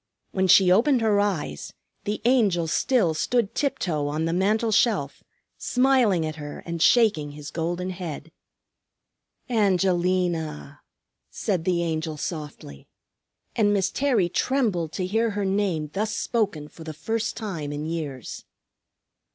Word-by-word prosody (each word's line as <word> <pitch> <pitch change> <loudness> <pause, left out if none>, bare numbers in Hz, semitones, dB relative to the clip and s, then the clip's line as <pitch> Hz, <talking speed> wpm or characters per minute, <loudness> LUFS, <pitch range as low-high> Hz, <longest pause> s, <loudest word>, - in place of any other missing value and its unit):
When 190 0 +1
she 185 0 +6
opened 240 +6 +4
her 215 -2 +3
eyes 175 - -2 0.3
the 210 +1 -3
Angel 210 -9 +3
still 185 - +2
stood 230 +6 0
tiptoe 165 - -1
on 155 +2 -1
the 165 - -1
mantel 215 +5 +1
shelf, 200 - +1 0.4
smiling 250 -10 +2
at 155 0 -5
her 145 -1 -8
and 170 -1 -4
shaking 200 -13 +3
his 150 0 -9
golden 175 +3 -2
head. 165 -3 -7 1.2
"Angelina!" 180 - 0 0.5
said 185 -7 -2
the 175 -2 +1
Angel 160 -1 -2
softly; 150 - -7 0.7
and 210 -3 +3
Miss 195 -1 +1
Terry 250 -10 +2
trembled 195 - 0
to 185 - -2
hear 225 +5 +1
her 205 -1 -2
name 190 -6 -1
thus 215 +2 -2
spoken 205 -11 -1
for 160 - -13
the 160 -1 -7
first 225 +8 -2
time 170 -10 -4
in 145 +1 -4
years. 150 -7 -5
180 Hz, 135 wpm, -25 LUFS, 155-215 Hz, 1.2 s, she